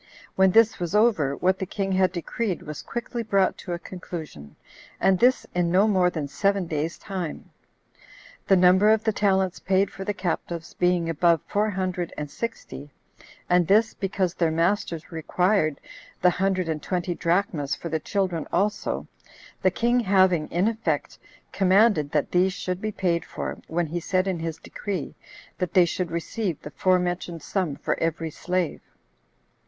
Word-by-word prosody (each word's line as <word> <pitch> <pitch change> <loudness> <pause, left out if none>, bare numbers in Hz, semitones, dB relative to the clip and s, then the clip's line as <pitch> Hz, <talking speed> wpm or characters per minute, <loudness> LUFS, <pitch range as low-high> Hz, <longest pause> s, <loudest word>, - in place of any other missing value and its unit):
When 190 0 +5
this 225 +3 +4
was 175 +2 -2
over, 205 - +3
what 185 +1 +1
the 190 - -2
king 195 0 -2
had 185 -1 +3
decreed 185 +2 -3
was 150 -1 -7
quickly 240 0 -4
brought 200 -4 +2
to 175 - -5
a - - -2
conclusion; 160 - -8 0.4
and 190 -1 +3
this 255 +2 +3
in 175 -1 +1
no 190 +5 +4
more 185 -4 +3
than 155 -5 -4
seven 195 +6 0
days' 160 0 -3
time, 185 -5 -6 1.0
the 195 - +6
number 185 +3 +5
of 220 0 +3
the 220 - +1
talents 190 -3 +1
paid 195 0 +1
for 195 - -7
the 205 +1 -2
captives 170 -2 -3
being 180 -1 +1
above 165 +1 +3
four 210 +1 0
hundred 185 -3 -2
and 150 -1 -5
sixty, 230 -10 -6 0.6
and 180 -2 +3
this, 215 +3 +4
because 190 -3 -1
their 170 -3 +1
masters 170 0 -1
required 165 0 +1 0.4
the 180 - +6
[hundred 185 -1 0
and] 155 -2 -2
twenty 175 +1 -2
drachmas 170 -5 0
for 170 - -7
the 160 0 -1
children 180 -2 -2
also, 205 +1 -1 0.5
the 185 - +4
king 240 +6 +1
having, 185 -7 +3
in 180 +5 +1
effect, 230 0 -2 0.3
commanded 190 -5 +3
that 150 -2 0
these 185 +1 +3
should 185 -1 -4
be 215 - -2
paid 175 -4 0
for, - - -6
when 170 +1 0
he 165 +3 -3
said 185 +2 0
in 185 -3 -1
his 165 -1 -4
decree, 185 0 -5 0.5
that 180 +1 -3
they 180 -2 +7
should 175 +1 -2
receive 170 +1 -3
the 150 - -8
forementioned 180 -1 0
sum 180 -8 -1
for - - -2
every 165 0 -1
slave. 180 0 -2
180 Hz, 165 wpm, -25 LUFS, 170-195 Hz, 1.0 s, they